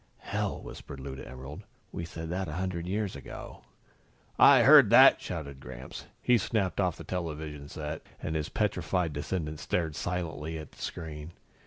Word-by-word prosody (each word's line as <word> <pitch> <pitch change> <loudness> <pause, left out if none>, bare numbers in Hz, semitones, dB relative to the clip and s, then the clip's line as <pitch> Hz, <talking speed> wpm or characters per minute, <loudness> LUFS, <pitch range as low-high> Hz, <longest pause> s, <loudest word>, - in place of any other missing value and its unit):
"Hell!" - - -2
whispered 70 - -9
Lou 65 0 -6
to 65 - -9
Emerald. 65 +3 -8 0.3
"We 85 - -4
said 80 0 -6
that 95 +1 -2
a 75 - -5
hundred 90 0 -3
years 100 -1 -1
ago." 70 - -9 0.7
"I - - +8
heard - - +9
that!" - - +8
shouted 70 -3 -5
Gramps. 65 0 -9 0.2
He 125 -1 +5
snapped 100 -3 0
off 90 -4 0
the - - -8
television 75 -5 -5
set 75 0 -5 0.2
and 80 - -3
his 75 -1 -1
petrified 90 -5 0
descendants 75 +1 -3
stared 80 -4 -1
silently 80 -2 -3
at 80 -2 -9
the - - -16
screen. 80 -1 -6
80 Hz, 165 wpm, -30 LUFS, 75-90 Hz, 0.7 s, heard